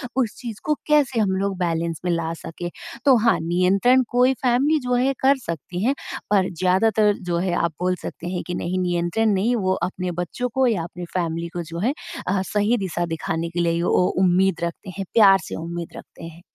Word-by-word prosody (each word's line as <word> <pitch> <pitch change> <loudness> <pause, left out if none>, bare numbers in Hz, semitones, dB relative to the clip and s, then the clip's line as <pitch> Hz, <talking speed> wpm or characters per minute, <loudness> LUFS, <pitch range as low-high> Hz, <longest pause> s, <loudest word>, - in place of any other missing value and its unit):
उस 245 -5 0
चीज़ 230 -4 -6
को 305 - +1
कैसे 285 -5 +3
हम 200 -3 +2
लोग 195 -1 -1
बैलेंस 165 -2 -1
में 180 - +1
ला 165 -1 -1
सकें? 165 +1 -7 0.4
तो 270 -2 +7
हाँ, 230 +1 +3
नियंत्रण 190 +9 +3
कोई 250 +2 +3
फ़ैमिली 265 +5 +3
जो 250 -2 -2
है 260 +3 +2
कर 270 +1 +4
सकती 170 +3 -4
हैं 270 +3 +2 0.4
पर 190 -2 +3
ज़्यादातर 205 +3 +3 0.2
जो 170 - +1
है 180 0 0
आप 170 - +1
बोल 185 0 +1
सकते 170 - -6
हैं 180 - -3
कि 175 - -3
नहीं 180 +2 -2
नियंत्रण 175 +4 +1
नहीं 205 +6 +1
वो 190 -4 +1
अपने 185 -1 -2
बच्चों 175 +8 -3
को 265 0 +3
या 210 -8 0
अपनी 175 +1 -7
फ़ैमिली 170 -2 -2
को 175 - -3
जो 165 +1 -7
है 235 +9 +1 0.3
अ, 190 +1 +1
सही 210 +4 +1
दिशा 175 -4 -2
दिखाने 165 0 -3
के 170 +1 -4
लिए 170 0 +1
ओ 180 +1 +3 0.2
उम्मीद 185 -1 +2
रखते 170 +3 -4
हैं। 195 - -3
प्यार 200 -4 +7
से - - -6
उम्मीद 170 0 -5
रखते - - -13
हैं। 165 +1 -11
185 Hz, 205 wpm, -22 LUFS, 170-225 Hz, 0.4 s, तो